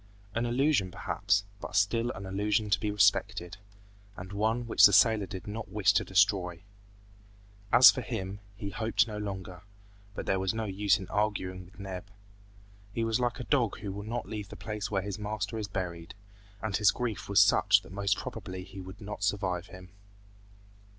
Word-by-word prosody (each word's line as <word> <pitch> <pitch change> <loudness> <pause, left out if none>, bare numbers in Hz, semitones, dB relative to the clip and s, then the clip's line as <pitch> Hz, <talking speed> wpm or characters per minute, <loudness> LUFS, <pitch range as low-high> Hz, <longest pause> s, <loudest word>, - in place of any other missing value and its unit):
An 120 +2 -1
illusion 125 -5 +2
perhaps, 100 +2 0
but 105 - -7
still 115 +4 +2
an 95 - -8
illusion 105 +2 0
to 100 - +4
be 105 - -2
respected, 100 -3 +2 0.6
and 95 +2 -8
one 110 +4 0
which 115 - +7
the 100 - -2
sailor 110 -1 +5
did 95 -3 -7
not 105 +2 -6
wish 100 -1 +3
to 105 - +2
destroy. 95 -3 +2 1.1
As 120 -2 +10
for 120 - -4
him, 95 -3 -5 0.2
he 100 -2 -6
hoped 110 +2 +1
no 105 -1 -5
longer, 95 -3 -6 0.5
but - - -5
there 95 - +1
was 95 +3 -1
no 110 0 -2
use 100 0 +2
in 95 -4 -8
arguing 95 -3 -2
with 90 - -19
Neb. 95 -2 -6 0.9
He 115 +2 -2
was 115 0 +1
like 120 -2 0
the - - -5
dog 120 -5 +1
who 100 - -4
will 100 +1 -6
not 115 +3 -4
leave 105 -2 -6
the - - -9
place 105 -2 -5
where 95 -2 -1
his 100 0 -5
master 105 +1 -3
is 105 - -3
buried, 85 -4 -5 0.5
and 110 -2 -1
his 105 -2 +5
grief 105 -6 -3
was 100 0 +5
such 100 - +5
that - - -14
most 100 0 0
probably 95 0 -6
he 95 - -11
would 95 +3 -11
not 105 0 -7
survive 95 -3 -1
him. 90 -1 -13
100 Hz, 185 wpm, -29 LUFS, 95-110 Hz, 1.1 s, As